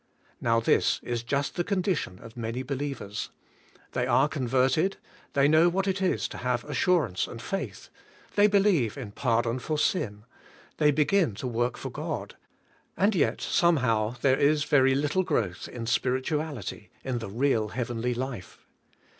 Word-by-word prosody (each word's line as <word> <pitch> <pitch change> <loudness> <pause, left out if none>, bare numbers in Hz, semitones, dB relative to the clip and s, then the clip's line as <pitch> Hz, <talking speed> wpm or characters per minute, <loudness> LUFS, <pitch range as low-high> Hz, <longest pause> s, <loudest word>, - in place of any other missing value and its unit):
Now 115 0 +3
this 115 - +2
is 120 -1 -2
just 140 +4 -1
the 175 - -1
condition 185 - -1
of 115 - -12
many 115 +2 -3
believers. 135 -6 -4 0.6
They - - -1
are - - +4
converted; 135 +6 +1 0.4
they 140 0 +4
know 160 +3 +5
what 195 +3 -1
it 190 0 0
is 190 - +1
to - - -8
have 125 -1 -1
assurance 150 - +1
and 115 - -8
faith; 195 +11 -5 0.5
they 205 0 +6
believe 195 - +2
in 120 -7 -6
pardon 120 +1 0
for 155 +4 -2
sin; 105 - 0 0.5
they 150 -1 +4
begin 150 - +2
to 110 - -6
work 120 0 -1
for - - -6
God; - - -5 0.6
and 205 +3 +3
yet, 130 - +1
somehow, 125 -10 +2
there 135 -1 +4
is 150 +1 +3
very 135 -2 +4
little 150 +6 +1
growth 105 - -1
in 115 -2 -6
spirituality, 130 - -2
in 130 -2 -2
the 110 - -6
real 115 0 +1
heavenly 120 +1 -2
life. 125 -6 -6
130 Hz, 155 wpm, -27 LUFS, 115-155 Hz, 0.6 s, they